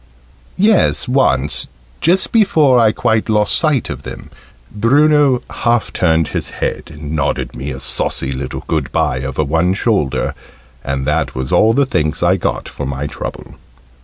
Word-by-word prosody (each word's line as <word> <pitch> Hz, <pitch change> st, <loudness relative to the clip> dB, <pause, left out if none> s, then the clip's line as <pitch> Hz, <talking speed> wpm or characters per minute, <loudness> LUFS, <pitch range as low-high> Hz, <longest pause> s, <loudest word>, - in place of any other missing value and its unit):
Yes, 205 Hz, -5 st, +3 dB
once, 75 Hz, -, +1 dB, 0.3 s
just 180 Hz, +4 st, +2 dB
before 155 Hz, -, +4 dB
I 110 Hz, -2 st, +4 dB
quite 110 Hz, +1 st, 0 dB
lost 105 Hz, -1 st, +3 dB
sight 155 Hz, -7 st, +1 dB
of 70 Hz, -1 st, -6 dB
them, -, -, -10 dB, 0.4 s
Bruno 140 Hz, +3 st, +3 dB
half 120 Hz, -1 st, 0 dB
turned 80 Hz, -3 st, +1 dB
his -, -, -3 dB
head, -, -, -4 dB
and 75 Hz, 0 st, -8 dB
nodded 75 Hz, -, -1 dB
me 65 Hz, +4 st, -5 dB
a 65 Hz, -2 st, -6 dB
saucy 65 Hz, 0 st, -1 dB
little 65 Hz, -, -5 dB
good -, -, -2 dB
bye 65 Hz, -, 0 dB
over 65 Hz, +3 st, -2 dB
one 80 Hz, +5 st, +1 dB
shoulder. 95 Hz, -, 0 dB, 0.5 s
And 70 Hz, 0 st, -3 dB
that 75 Hz, -2 st, -1 dB
was 65 Hz, 0 st, -4 dB
all 110 Hz, +1 st, +4 dB
the 140 Hz, +1 st, +3 dB
thanks 80 Hz, -, -1 dB
I 90 Hz, +2 st, +4 dB
got -, -, -3 dB
for 70 Hz, -, -6 dB
my 70 Hz, +1 st, -4 dB
trouble. 75 Hz, -, -7 dB
90 Hz, 160 wpm, -16 LUFS, -, 0.5 s, before